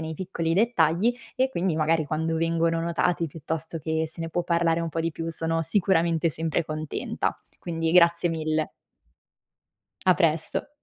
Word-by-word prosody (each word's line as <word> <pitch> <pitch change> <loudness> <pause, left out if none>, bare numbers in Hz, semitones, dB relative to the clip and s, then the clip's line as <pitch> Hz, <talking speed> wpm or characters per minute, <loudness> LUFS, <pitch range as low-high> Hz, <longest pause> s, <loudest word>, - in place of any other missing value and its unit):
nei 160 0 -4
piccoli 165 -2 -2
dettagli 200 0 +3 0.2
e 260 +1 +2
quindi 180 -8 -1
magari 160 0 +2
quando 160 +2 -1
vengono 165 0 +1
notati, 170 0 0
piuttosto 160 +2 -5
che 160 +1 -1
se 165 +1 -6
ne 165 - -4
può 175 +2 0
parlare 170 -1 +2
un 165 - -2
po' 165 +1 -3
di 165 +1 -1
più 165 +1 -4
sono 165 0 0
sicuramente 170 -2 +2
sempre 160 +1 -1
contenta. 155 -1 -3 0.2
Quindi 165 -1 -2
grazie 170 -1 +5
mille. 155 -1 -1 1.4
A 185 - +7
presto. 165 - 0
165 Hz, 155 wpm, -26 LUFS, 160-170 Hz, 1.4 s, A